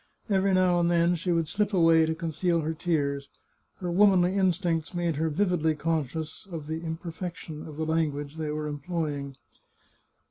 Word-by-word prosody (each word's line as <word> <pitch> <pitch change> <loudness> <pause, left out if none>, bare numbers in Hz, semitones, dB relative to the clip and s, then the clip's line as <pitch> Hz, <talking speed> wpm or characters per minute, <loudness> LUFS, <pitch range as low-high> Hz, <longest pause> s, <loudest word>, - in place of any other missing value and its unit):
Every 195 0 +3
now 180 -1 +3
and 170 0 +2
then 170 0 +3
she 175 +1 -1
would 165 -2 +1
slip 205 +5 0
away 165 -2 +5
to 160 - -1
conceal 165 +1 0
her 160 +1 -2
tears. 145 -4 -1 0.5
Her 180 -2 -4
womanly 185 -1 +5
instincts 175 -3 0
made 170 -4 0
her 160 +1 +1
vividly 160 -2 +1
conscious 160 +1 -3
of 160 -3 -5
the 160 +1 -4
imper 165 0 -5
fection 165 -3 -7
of 150 -2 -9
the 160 - -1
language 155 -2 -1
they 155 -1 -3
were 150 0 -3
employing. 145 -2 -3
165 Hz, 170 wpm, -27 LUFS, 155-175 Hz, 0.5 s, away